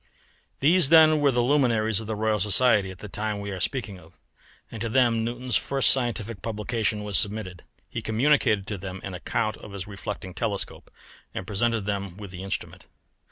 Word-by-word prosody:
These 160 +1 +5
then 155 -1 +7
were 145 -1 +4
the 120 -2 +2
luminaries 120 -6 +2
of 110 - -7
the 110 - -2
Royal 110 0 0
Society 105 -1 +3
at 95 - -9
the 105 - -9
time 105 +2 -3
we 100 0 -5
are 95 - -5
speaking 100 -2 -3
of, 85 0 -18 0.6
and 110 - -7
to 115 - -2
them 115 -2 +3
Newton's 120 -1 0
first 135 +7 +3
scientific 115 -4 -1
publication 110 -1 -2
was 100 -5 +2
submitted. 100 -4 -2 0.2
He - - -5
communicated 110 -3 +2
to 105 -2 -5
them 95 0 -7
an 95 - -6
account 110 +4 -2
of 100 - -11
his 95 -2 -5
reflecting 100 -2 -6
telescope, 100 +1 -3 0.5
and 95 - -4
presented 110 +3 0
them 100 -3 -3
with 100 -3 -9
the 90 0 -8
instrument. 95 0 -5
110 Hz, 185 wpm, -26 LUFS, 100-120 Hz, 0.6 s, then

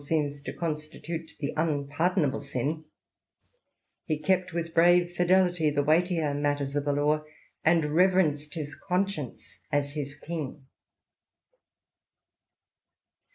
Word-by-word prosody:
seems 145 -1 -1
to - - -5
constitute 160 +1 -5
the 140 - -2
unpardonable 150 0 0
sin, 145 +3 -3 1.2
he 155 - -1
kept 185 +3 +1
with 165 0 -3
brave 175 +1 +5
fidelity 175 -2 +3
the 145 -1 +1
weightier 160 0 +2
matters 145 -1 -1
of 145 -1 0
the 145 - +2
law, 150 +2 +1 0.4
and 160 -2 +3
reverenced 165 -4 +3
his 150 -2 -4
conscience 180 - -3
as 145 0 +1
his 145 -1 -4
king. 150 -3 -6
155 Hz, 110 wpm, -28 LUFS, 145-170 Hz, 1.2 s, brave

